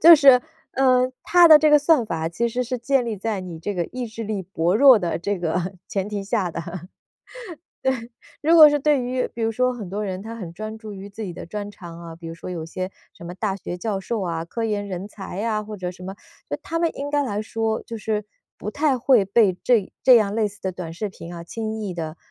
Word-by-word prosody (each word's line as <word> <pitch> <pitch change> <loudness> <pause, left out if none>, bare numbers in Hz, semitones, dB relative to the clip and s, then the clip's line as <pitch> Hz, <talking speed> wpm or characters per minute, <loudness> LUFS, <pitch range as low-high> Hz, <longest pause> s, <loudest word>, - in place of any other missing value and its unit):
就 335 +1 +11
是， 270 -4 +7 0.3
嗯， 255 -1 +3
它 350 -1 +6
的 310 -1 +10
这 305 0 +4
个 295 - +8
算 290 -5 +3
法， 160 -2 -2
其 235 +7 0
实 250 +2 -2
是 250 +1 -3
建 260 +1 +1
立 230 - -2
在 210 0 -2
你 170 -3 -7
这 205 +5 -4
个 175 -1 -1
意 250 +4 -5
志 225 +1 -7
力 205 -2 -3
薄 175 0 0
弱 260 -1 +8
的 175 -3 -2
这 200 +3 -2
个 175 +2 -2
前 195 0 -2
提 205 -2 -4
下 195 -3 0
的， 165 - -5 1.8
对。 320 - +3
如 335 - +7
果 305 -2 +10
是 295 0 +1
对 290 -1 +2
于 250 +1 -1
比 230 - -6
如 225 - +2
说 250 +2 +1
很 210 -7 -7
多 205 +3 -3
人， 190 -2 -4
他 225 +2 -7
很 185 -7 -7
专 215 +5 -7
注 220 -2 -9
于 195 +1 -9
自 215 +2 -7
己 185 - -4
的 170 - -8
专 205 +3 -5
长 170 -4 -11
啊， 165 -1 -9
比 170 - -9
如 165 - -6
说 170 - -9
有 165 -3 -4
些 185 +3 -5 0.2
什 - - -14
么 175 - -6
大 195 0 -2
学 180 -2 -6
教 200 0 -2
授 220 +1 -3
啊， 165 -2 -2
科 225 +7 -3
研 205 -2 -1
人 190 +1 -5
才 200 -1 -7
啊， 215 -2 0
或 210 0 -8
者 180 -1 -4
什 180 - -13
么， 190 +1 -6 0.3
就 - - -2
他 330 0 -3
们 335 - +2
应 285 +1 -4
该 290 -1 +1
来 210 -4 -2
说， 225 0 -2
就 230 -1 -7
是 215 -1 -2 0.3
不 210 - -5
太 285 -3 +1
会 245 -4 +4
被 195 -2 +3
这 230 -6 +3
这 255 - +8
样 210 -1 0
类 215 -2 +1
似 205 - -17
的 190 -1 -3
短 175 -3 -6
视 205 +6 -4
频 175 -2 -10
啊， 170 0 -7
轻 220 +2 -4
易 195 -4 -4
地 160 -1 -5
210 Hz, 270 characters per minute, -23 LUFS, 185-240 Hz, 1.8 s, 就